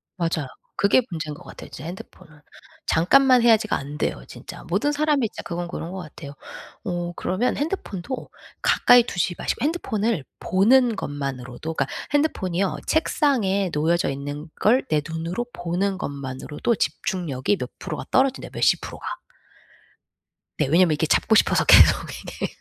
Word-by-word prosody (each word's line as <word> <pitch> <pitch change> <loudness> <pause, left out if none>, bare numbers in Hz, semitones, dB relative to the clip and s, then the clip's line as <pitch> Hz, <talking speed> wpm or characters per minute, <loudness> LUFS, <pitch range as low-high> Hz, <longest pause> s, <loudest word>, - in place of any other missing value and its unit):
맞아요. 165 -5 -1 0.3
그게 200 +5 +5
문제인 155 -4 -4
것 170 +5 -12
같아요 - - -11
진짜 140 - -9
핸드폰은. 170 -3 -11 0.5
'잠깐만 255 +9 +5
해야지.'가 225 -2 +4
안 145 +2 -6
돼요 - - -2
진짜. - - -10
모든 290 +1 +1
사람이 295 -4 +1
진짜 - - -8
그건 175 0 -4
그런 170 -1 -6
것 190 - -6
같아요. 155 -3 -9 0.5
어 175 -3 -2
그러면 195 +8 -1
핸드폰도 265 - -4 0.3
가까이 245 -1 +6
두지 180 -5 -1
마시고 - - -2
핸드폰을 230 - -1 0.2
보는 235 +5 +4
것만으로도 140 0 -5
그러니까 135 -4 -2 0.2
핸드폰이요 195 - 0
책상에 220 - +1
놓여져 165 +4 +1
있는 145 +3 -5
걸 245 +5 +3
내 155 -1 +2
눈으로 165 +8 -3
보는 180 +3 -1
것만으로도 140 - -3
집중력이 160 0 -1
몇 - - -5
프로가 - - -5
떨어진대요 265 0 +1
몇십 - - +3
프로가. - - -6 1.4
네 150 - +3
왜냐하면 165 +3 +4
이게 150 +1 0
잡고 220 +7 +3
싶어서 - - +4
계속 - - +8 0.2
이게 - - -6
180 Hz, 360 characters per minute, -23 LUFS, 155-235 Hz, 1.4 s, 계속